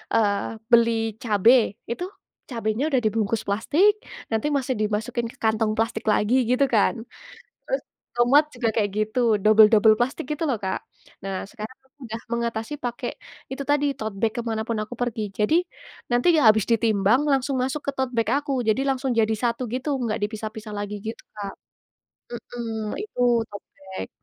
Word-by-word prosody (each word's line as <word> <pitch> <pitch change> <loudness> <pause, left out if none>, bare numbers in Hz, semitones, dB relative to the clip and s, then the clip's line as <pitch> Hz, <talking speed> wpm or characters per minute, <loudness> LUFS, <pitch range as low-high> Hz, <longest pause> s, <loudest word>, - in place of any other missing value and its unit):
eee, 205 0 +1 0.2
beli 225 -2 +3
cabe. 225 +1 +4
Itu, 350 +10 -4 0.4
cabenya 230 +4 -1
udah 270 - +2
dibungkus 220 0 0
plastik, 330 - +2 0.3
nanti 225 +7 +1
masih 270 -3 0
dimasukin 220 +2 -2
ke - - -15
kantong 220 -1 0
plastik 225 0 0
lagi, 230 +4 +2
gitu, 255 +3 +4
kan. 230 -3 +2 0.7
Terus, - - -2 0.3
tomat 245 +5 +5
juga 240 -2 -2
kayak 210 -2 +1
gitu, 215 +4 -1 0.2
dobel-dobel 215 +1 +6
plastik 250 +3 -2
gitu, 330 - -4
loh, 265 -9 0
Kak. 190 -1 -3 0.4
Nah, 195 -1 -4
sekarang, 215 +2 -8
aku 265 +1 -35
udah 225 -1 -5
mengatasi 235 +2 -2
pakai 245 -3 -4 0.3
itu 265 +2 -5
tadi, 290 +1 +1
tote 215 -4 -5
bag 225 -1 0
ke 240 - -1
mana 220 -1 -3
pun 230 - -1
aku 215 - -13
pergi. 220 -4 -2
Jadi, 210 +10 +1 0.6
nanti 245 +8 +4
habis 220 -8 +5
ditimbang, 225 +2 +3
langsung 270 0 +1
masuk 265 +3 -2
ke - - +2
tote 265 -1 -1
bag 230 -2 0 0.2
aku. 275 -3 -1
Jadi 220 +5 +2
langsung 265 -2 0
jadi 220 -1 +2
satu 240 +1 -1
gitu, 270 +3 -1
nggak 225 -1 -1
dipisah-pisah 215 0 -7
lagi 205 0 -4
gitu, 230 - -6
Kak. 200 -2 -6 0.8
Mhm. 225 -2 -5
Itu 245 - +1
tote 205 -2 -11
bag. 190 -1 -7
230 Hz, 165 wpm, -24 LUFS, 215-255 Hz, 0.8 s, dobel-dobel